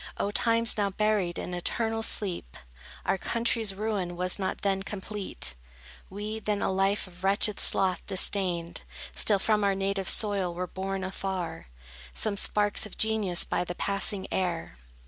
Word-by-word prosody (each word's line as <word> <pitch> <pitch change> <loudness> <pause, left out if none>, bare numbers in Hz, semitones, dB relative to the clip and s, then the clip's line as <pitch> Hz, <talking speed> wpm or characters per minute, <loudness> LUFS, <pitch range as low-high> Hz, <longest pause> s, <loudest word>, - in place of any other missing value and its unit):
O 200 - -1
times, 230 +1 +3
now 200 -1 +2
buried 200 -4 0
in 180 - -5
eternal 225 +5 -1
sleep! 185 - -2 0.5
Our 190 - +1
country's 230 -3 +1
ruin 200 -4 -2
was 180 +2 0
not 190 -1 -3
then 195 -1 0
complete; 195 - -3 0.6
We 210 +3 -5
then 210 -2 -1
a - - +1
life 195 +2 +1
of 180 -1 -15
wretched 200 +2 +1
sloth 185 -3 +2
disdained; 180 -3 +2 0.3
Still 205 - +3
from 210 +1 +1
our 200 -1 +2
native 195 -1 -1
soil 195 -5 +5
were 180 +1 -2
borne 190 +1 -4
afar, 190 - -4 0.5
Some 215 -2 0
sparks 205 +1 +2
of 210 - -12
genius 215 -5 +2
by - - -1
the 175 0 -6
passing 200 0 -2
air. 170 - -2
195 Hz, 150 wpm, -28 LUFS, 185-210 Hz, 0.6 s, soil